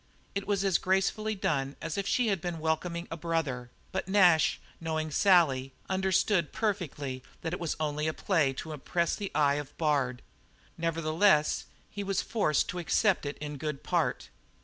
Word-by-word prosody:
It 200 0 -3
was 200 -1 +1
as 190 -2 +3
gracefully 195 +3 +1
done 140 -7 -1
as 165 -1 -4
if 200 0 -2
she 245 0 +2
had 195 -5 0
been 175 -2 -3
welcoming 170 +2 -1
a 165 - -3
brother, 150 -7 -2 0.2
but - - -3
Nash, 180 -5 +5 0.2
knowing 160 -1 -2
Sally, 145 -8 +4 0.2
understood 190 -2 +2
perfectly 150 - -2 0.2
that 165 - -3
it - - -3
was 170 -3 -2
only 150 0 -1
a 155 - 0
play 165 -9 +2
to 155 +4 -6
impress 170 +4 -1
the 200 -2 -5
eye 145 -1 +3
of 145 - -14
Bard. 140 -6 0 0.5
Nevertheless 165 0 +2 0.3
he 205 - -4
was 195 -1 0
forced 155 -10 +1
to 180 - -3
accept 180 -1 +2
it 145 - -5
in 150 -1 -6
good 150 -1 -4
part. - - 0
165 Hz, 170 wpm, -30 LUFS, 150-190 Hz, 0.5 s, Nash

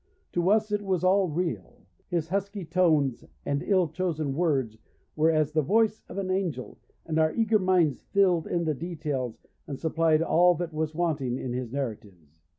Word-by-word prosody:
To 175 +1 +1
us 215 0 +2
it 205 0 0
was 190 -3 -1
all 190 +1 +4
real. 180 +8 -4 0.2
His 170 -3 -1
husky 200 0 -3
tones 160 -7 +2 0.2
and 140 0 -1
ill 185 -4 +2
chosen 160 -3 -2
words 135 -8 0 0.4
were 160 +1 +3
as 155 -2 +2
the 155 0 +2
voice 215 +7 +2
of - - -8
an 190 -1 -2
angel, 175 -10 -3 0.3
and 160 -1 -1
our 155 0 +3
eager 225 -1 +3
minds 180 -7 +2
filled 185 -5 +2
in 170 -1 -1
the 155 - +1
details 150 -6 -4 0.2
and 140 - -5
supplied 160 -1 +2
all 175 +1 +4
that 170 0 -4
was 155 0 -2
wanting 150 -7 -1
in 125 -2 -4
his 125 -2 -4
narratives. 100 - -6
165 Hz, 175 wpm, -27 LUFS, 145-185 Hz, 0.4 s, all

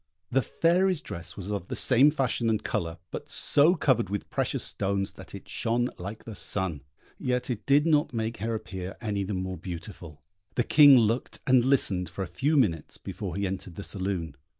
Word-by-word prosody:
The 135 +2 +3
Fairy's 180 +5 +2
dress 85 - -8
was 100 +1 -5
of 100 -3 -3
the - - -3
same 130 +3 +5
fashion 130 -5 0
and 110 -2 0
colour, 85 0 -2
but - - -7
so 155 +5 +4
covered 120 - +1
with 100 0 -4
precious - - -1
stones 100 -1 -1
that - - -10
it - - -10
shone 120 +2 0
like 100 +5 -7
the 115 - -8
sun; 95 -7 -2 0.4
yet 125 0 -1
it 115 - -5
did 145 +2 +4
not 150 -2 +3
make 115 -1 -3
her 115 +2 -2
appear 95 -3 -6
any 105 -4 -2
the 100 +1 -3
more 95 0 -3
beautiful. 85 -3 -9 0.3
The 120 - +2
King 145 0 +8
looked 115 +1 +1
and 130 -2 +5
listened 105 -9 +2
for 95 - -4
a 90 - -10
few 150 +3 +2
minutes 85 - 0
before 95 -5 -6
he 100 +1 -1
entered 95 -2 -5
the 100 - -6
saloon. 95 -7 -4
105 Hz, 195 wpm, -27 LUFS, 95-130 Hz, 0.4 s, King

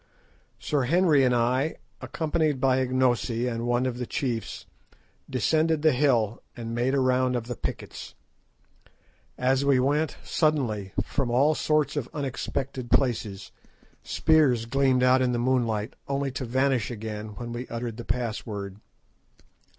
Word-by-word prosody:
Sir 140 -4 -1
Henry 160 -1 +4
and 125 -1 +3
I, 130 +6 +1 0.3
accompanied 155 -3 -1
by 130 0 +3
Ignosi 125 -2 +1
and 115 0 -3
one 120 +1 +1
of 125 -1 -2
the 125 - -3
chiefs, 120 -5 -3 0.6
descended 155 +4 +1
the 155 - +6
hill 125 -5 +1 0.2
and 115 -1 -5
made 125 +3 +1
a - - +2
round 130 -1 +2
of 120 -2 -2
the 120 0 -5
pickets. - - -6 1.2
As 130 +2 +2
we 140 -2 +4
went, 145 +4 +1
suddenly, 120 - 0
from 135 -4 -2
all 135 +6 +3
sorts 150 -2 +1
of 135 -4 -3
unexpected 135 -2 -4
places, 115 -6 0 0.5
spears 145 -8 +2
gleamed 130 +1 +2
out 130 +1 +5
in 125 -1 +1
the - - 0
moonlight, 120 -3 0
only 140 0 -1
to 130 0 -4
vanish 130 -2 +1
again 110 -2 -6
when 120 +1 -6
we 120 +2 -5
uttered 115 -1 -5
the 120 - -6
password. 105 -5 -4
125 Hz, 145 wpm, -26 LUFS, 120-140 Hz, 1.2 s, the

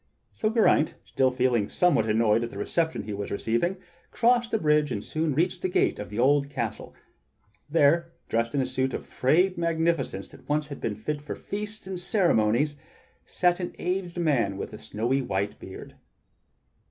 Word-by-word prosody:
So 215 - -1
Geraint, 220 -8 +3
still 130 -1 +2
feeling 125 -4 +1
somewhat 175 -11 +2
annoyed 110 +1 +3
at 120 - -3
the 100 - -10
reception 160 +6 -1
he 105 0 -5
was 100 0 -4
receiving, 120 - 0 0.3
crossed 240 0 +2
the - - +1
bridge 150 -4 +2
and - - -3
soon 155 -2 -1
reached 175 +3 0
the 185 - 0
gate - - +1
of 105 - -6
the 105 - -7
old 140 +3 +3
castle. 120 -6 -4 0.7
There, 165 +2 +3 0.2
dressed 115 +2 0
in 140 - +2
a - - 0
suit 130 +1 -1
of - - -6
frayed 175 +7 +2
magnificence 165 - 0
that - - -17
once 150 0 0
had 140 - -8
been 105 - -2
fit 145 +8 -4
for 145 - -6
feasts 210 +1 -4
and 190 -1 -5
ceremonies, 145 - +2 0.5
sat 175 0 +2
an 180 - -4
aged 180 -1 -2
man 130 - +1
with 100 - -6
a 105 - -8
snowy 115 +5 -1
white 100 -4 -2
beard. 95 - -10
145 Hz, 175 wpm, -27 LUFS, 115-175 Hz, 0.7 s, Geraint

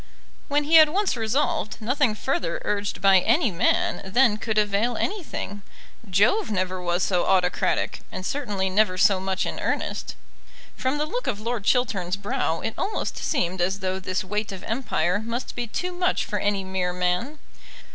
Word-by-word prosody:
When 290 +1 +1
he 320 +3 +6
had 310 -1 +8
once 390 +2 0
resolved, 245 +4 -1
nothing 245 0 +1
further 185 -8 -2
urged 205 0 -2
by 195 -1 +6
any 235 - +2
man 175 - +1
then 215 +3 +3
could 220 0 -3
avail 210 +3 +1
anything. 315 - -4 0.5
Jove 220 - +3
never 185 -2 -1
was 175 0 0
so 180 -3 +1
autocratic, 180 -2 +1
and 185 0 -6
certainly 205 -9 -1
never 190 -1 +2
so 195 0 +4
much 190 0 -1
in - - -4
earnest. - - -2 0.6
From 260 +3 -1
the 300 - 0
look - - -4
of 210 -5 -1
Lord 230 -1 -3
Chiltern's 195 -8 +1
brow 195 -5 -1
it 225 - -3
almost 425 - -2
seemed 185 - -1
as 190 +2 +1
though 190 0 -1
this 185 +1 -2
weight 210 +2 -3
of 190 -2 -8
empire 205 -6 0
must 230 +3 -4
be 240 -1 -3
too 360 +11 -3
much 360 +1 0
for 205 - -2
any 200 0 0
mere 190 -1 -2
man. 180 +11 -1
210 Hz, 170 wpm, -24 LUFS, 185-255 Hz, 0.6 s, had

